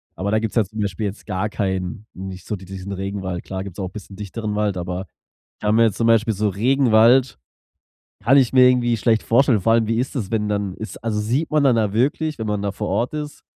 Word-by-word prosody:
Aber 100 +4 -2
da 110 - +3
gibt's 110 +1 -4
ja 115 - +4
jetzt 100 - -15
zum 110 - -7
Beispiel 100 0 -2
jetzt 100 +1 -6
gar 105 +3 -2
keinen 95 +2 -3
nicht 95 -1 -8
so 105 - -2
d 95 - -11
diesen 95 +1 -7
Regenwald. 95 -2 -4
Klar 95 0 -5
gibt's 95 -3 -9
auch 95 - -3
bisschen 100 -2 -10
dichteren 105 +1 -5
Wald, 105 -2 0
aber 90 +2 -4 0.5
kann 105 0 +1
mir 115 0 +5
jetzt 110 - 0
zum 115 - 0
Beispiel 115 -1 +3
so 105 +1 +1
Regenwald 120 +2 +3 0.9
kann 135 +4 +5
ich 130 -4 +4
mir 125 -1 +7
irgendwie 120 -2 +2
schlecht 110 0 +2
vorstellen. 120 -3 +3
Vor 115 - +2
allem 115 -2 +3
wie 115 +1 0
ist 130 +2 -3
es, 105 -6 -3
wenn 105 -2 0
dann 100 -2 -2
ist 110 - -8
also, 105 -2 -1
sieht 125 +9 -1
man 150 -1 +3
dann 130 -4 +4
da 105 -3 +1
wirklich, 150 +6 0
wenn 110 - -2
man 105 -1 -1
da 100 - -2
vor 105 0 -4
Ort 125 +5 -1
ist, 150 -1 -6
105 Hz, 245 wpm, -21 LUFS, 100-115 Hz, 0.9 s, mir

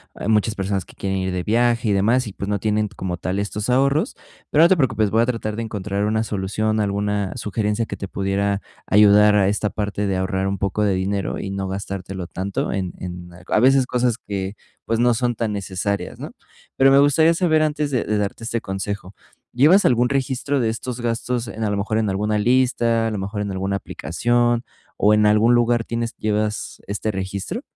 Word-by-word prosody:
ah, - - -5
muchas 110 0 +2
personas 95 -2 -2
que - - -17
quieren 95 0 -2
ir 95 0 -2
de 90 -1 -2
viaje 115 +1 +2
y - - +3
demás 115 +6 +2
y, 105 - -7
pues, 100 - -6
no 105 - +1
tienen 105 0 0
como 90 -2 -4
tal 90 +2 -3
estos 105 +2 -3
ahorros, 140 +4 +2 0.3
pero 155 - +5
no 170 - +6
te 190 - +5
preocupes, 110 -8 +1
voy 110 +1 +3
a - - +3
tratar 115 -3 -2
de 115 - -3
encontrar 105 -2 -3
una 110 +1 +1
solución, 110 +2 -1
alguna 100 -1 -1
sugerencia 105 +2 -1
que - - -6
te 100 - -5
pudiera 100 +1 -1 0.3
ayudar 105 0 +6
a 100 -2 +4
esta 105 +1 0
parte 105 -1 -2
de 95 -1 0
ahorrar 95 +1 -1
un 100 0 -1
poco 100 +2 -1
de 100 -2 +2
dinero 95 +1 -2
y 95 - -4
no 95 -1 -3
gastártelo 95 -1 -5
tanto 95 +2 -3
en 95 -3 -3
en 90 -1 -7 0.2
a - - +2
veces 130 +1 +5
cosas 125 -2 0
que, 100 -3 -5 0.3
pues, 115 - 0
no 120 0 +4
son 120 +1 0
tan 110 -1 -2
necesarias, 100 0 -3
¿no? - - -7 0.4
Pero 135 0 +5
me 135 - +6
gustaría 155 +4 +4
saber 160 -3 +2
antes 150 -1 0
de 125 - +1
de 105 - 0
darte 105 +2 -3
este 115 0 -2
consejo, 95 0 -5 0.4
¿llevas 155 +11 +5
algún 125 0 +3
registro 135 +1 -1
de 115 - +1
estos 120 +2 -5
gastos 120 +1 -2
en, 110 +2 -5
a - - 0
lo 100 - 0
mejor, 110 +2 -1
en 110 -2 +1
alguna 105 +2 0
lista, 120 -1 +2
a - - -2
lo 105 - -3
mejor 100 +2 -4
en 100 -1 -3
alguna 95 +1 -2
aplicación 120 +6 0 0.3
o 105 +1 +4
en 105 0 +4
algún 105 +3 +4
lugar 120 -1 +3
tienes 115 0 -3
llevas 105 0 -2
este 105 +2 -2
registro? 100 - -4
105 Hz, 210 wpm, -21 LUFS, 100-120 Hz, 0.4 s, no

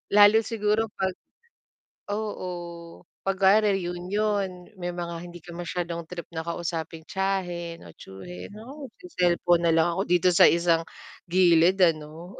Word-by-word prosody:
Lalo 205 +1 +8
siguro 220 -1 0
'pag 190 -1 0 1.0
oo 210 -3 -3 0.8
'pag 195 -1 -1
kunwari 195 -1 +4
union, 185 +1 -2
may 175 0 -3
mga 170 -1 -4
hindi 175 0 -10
ka 175 - -11
mas'yadong 170 -1 -4
trip 175 -1 -6
na 160 - -2
kausapin 165 -1 -4
tiyahin 175 -3 -3
o - - -12
tiyuhin, 90 -2 -10
oo, 270 +4 -10
se-cellphone 175 - +1
na - - +4
lang 165 +1 +4
ako 190 - 0
dito 180 +1 +3
sa - - +8
isang 170 -1 +2 0.5
gilid 180 +1 +5
ano. 165 +2 0
175 Hz, 135 wpm, -26 LUFS, 170-195 Hz, 1.0 s, Lalo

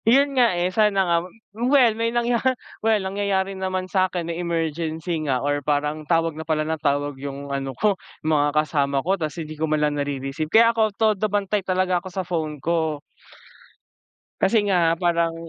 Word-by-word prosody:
Yun 275 +5 +4
nga, 240 -8 +3
eh, 180 +1 0
sana 200 -2 +3
nga 170 -1 +2 0.4
well 245 +1 +4
may 230 +1 -1
nangya 235 0 0 0.4
well 220 0 +3
nangyayari 195 0 -1
naman 185 -1 -3
sakin 185 -2 0
may 170 +1 -4
emergency 165 0 -2
nga 130 0 0
or 145 0 0
parang 150 +1 -1
tawag 165 -1 +2
na 155 - -7
pala 155 -1 -1
ng 160 -1 -3
tawag 145 0 0
yung 140 0 -6
ano 135 -2 -4
ko, 210 -1 +3 0.3
mga 150 -2 +3 0.2
kasama 140 -2 0
ko 190 - +2
tapos 155 0 -3
hindi 155 - -8
ko 160 - 0
man 155 - +2
lang 150 -1 +1
na-rereceive 140 +2 -3
kaya 230 +4 +5
ako 220 -1 +2
todo 215 -1 +2
bantay 205 0 0
talaga 185 -1 0
ako 190 - -9
sa 185 0 -4
phone 160 -3 -3
ko. 160 0 -1 1.4
Kasi 210 +4 +3
nga 170 -4 +3
parang 170 -1 +1
170 Hz, 180 wpm, -23 LUFS, 150-200 Hz, 1.4 s, kaya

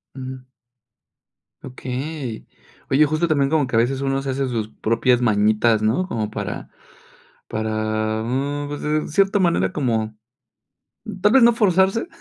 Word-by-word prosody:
Ujú. 130 -1 -7 1.2
Okey. 130 -1 -6 0.4
Oye, 150 +3 +5
justo 155 +3 0
también, 140 -4 +2
como 150 -4 +1
que - - -3
a 115 - +5
veces 130 +3 0
uno 135 0 0
se 135 -1 -3
hace 135 0 -1
sus 110 -3 -3
propias 115 +3 +1
mañitas, 110 0 +3
¿no? 120 +13 +1
Como 110 - -3
para - - -5 0.8
para, 110 0 -2
mm, 140 +4 -2
pues, 145 - -6
en 150 0 -1
cierta 195 +4 +2
manera 130 - +2
como 110 -6 -1 1.0
tal 210 +2 +4
vez 265 -3 +6
no 235 0 +6
forzarse, 195 - +2
130 Hz, 145 wpm, -21 LUFS, 110-155 Hz, 1.2 s, vez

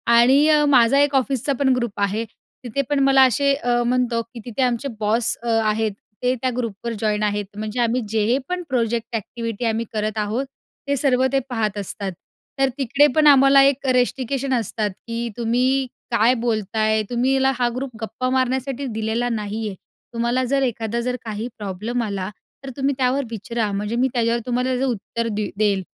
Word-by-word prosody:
आणि 265 +5 +6
अ, 300 -1 +5
माझा 265 -1 +5
एक 285 -1 +3
ऑफिसचा 270 +1 +1
पण 265 -2 +3
ग्रुप 235 -5 -3
आहे, 205 +3 0 0.4
तिथे 250 +3 -1
पण 290 -1 +1
मला 270 -1 +6
असे 280 +4 +2
अ, 240 -3 0
म्हणतो 245 -1 +1
की 230 +1 -11
तिथे 245 +2 -3
आमचे 250 +2 0
बॉस 225 +2 +1
अ, 235 - -2
आहेत 215 -1 0 0.3
ते 250 +1 +2
त्या 255 - +1
ग्रुपवर 230 -1 -3
जॉइन 215 -1 0
आहेत, 205 -1 0
म्हणजे 215 +2 -4
आम्ही 240 +2 +1
जे 225 +3 +2
पण 360 0 -2
प्रोजेक्ट 235 -2 -1
एक्टिव्हिटी 230 +1 -4
आम्ही 225 +1 0
करत 215 0 -2
आहोत, 215 +6 -1 0.4
ते 280 - +1
सर्व 260 -1 +2
ते 270 - +4
पाहत 215 -4 -1
असतात. 200 0 -4 0.5
तर 270 - +3
तिकडे 280 +2 +4
पण 305 -1 +5
आम्हाला 275 -1 +7
एक 275 0 +2
रिस्ट्रिक्शन 260 +2 0
असतात, 220 -3 -1 0.2
की 235 +1 -3
"तुम्ही 250 +3 +1 0.2
काय 235 +2 +4
बोलताय? 220 -2 0
तुम्हीला 265 +2 +2
हा 245 - +2
खूप 270 -1 -5
गप्पा 225 +4 -3
मारण्यासाठी 260 +1 -1
दिलेला 225 +2 -1
नाहीये. 215 -2 -3 0.4
तुम्हाला 235 +2 0
जर 275 +2 +1
एखादा 235 -2 -2
जर 250 +1 -1
काही 220 +1 -4
प्रॉब्लेम 210 +4 -3
आला 200 -3 -3 0.3
तर 270 - -6
तुम्ही 275 +1 +1
त्यावर 265 +1 +1
विचरा, 225 0 -2
म्हणजे 210 +3 -2
मी 255 +2 +2
त्याच्यावर 235 -1 +1
तुम्हाला 250 +1 0
त्याचं 260 +1 0
उत्तर 230 0 -3
दे 210 0 -2
देईल, 200 -3 +1
235 Hz, 175 wpm, -22 LUFS, 220-260 Hz, 0.5 s, आम्हाला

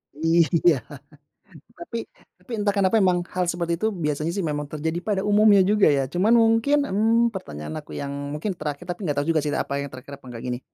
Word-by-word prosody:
Iya, 165 -1 +3 0.9
tapi 245 -9 -6 0.3
tapi - - -22
entah 205 -1 +1
kenapa 200 0 +1
memang 175 -1 +2
hal 180 -1 +1
seperti 170 -1 -2
itu 220 +6 -1
biasanya 155 -3 -2
sih 190 0 -3
memang 150 0 -4
terjadi 160 +2 -3
pada 200 -3 -1
umumnya 205 -2 +5
juga 210 -5 +4
ya. 135 -2 +1
Cuman 180 - 0
mungkin, 230 +6 +3
mmm, 225 +2 +2
pertanyaan 75 - -7
aku - - -19
yang 140 0 -4 0.2
mungkin 170 +7 -3
terakhir, 150 +1 -6
tapi 175 +3 -5
nggak 145 -5 -1
tau 145 - 0
juga 160 -3 +1
sih 150 - -2
apa 140 -1 -2
yang 140 - -6
terakhir 130 +2 -10
apa 135 - -16
nggak 115 0 -8
gini, 125 0 -2
175 Hz, 200 wpm, -24 LUFS, 150-205 Hz, 0.9 s, umumnya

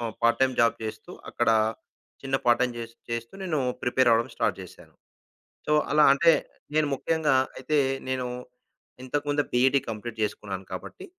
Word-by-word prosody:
ఆహ్, 115 -2 -4
part 115 +2 +3
time 130 -1 +2
job 115 - +3
చేస్తూ, 110 - -7 0.2
అక్కడ 120 - +1 0.7
చిన్న 135 0 0
పార్ట్ 120 0 +4
టైమ్ 125 -1 0
చే 115 - -3 0.3
చేస్తూ 115 +3 -4
నేను 160 -5 -1 0.2
ప్రిపేర్ 125 0 +3
అవ్వడం 115 +1 +2
స్టార్ట్ - - 0
చేశాను. - - -15 0.7
సో, - - 0 0.2
అలా 150 0 +5
అంటే, 165 +4 +5 0.4
నేను 155 -1 +3
ముఖ్యంగా 155 -2 +1 0.2
అయితే 150 +3 -1 0.3
నేను 130 -1 -1 0.8
ఇంతకుముందే 145 +2 -1
బీఈడీ 130 +3 +4
కంప్లీట్ 115 +1 -6
చేసుకున్నాను 100 -2 -4
కాబట్టి, 95 - -8
125 Hz, 150 wpm, -26 LUFS, 115-145 Hz, 0.8 s, అలా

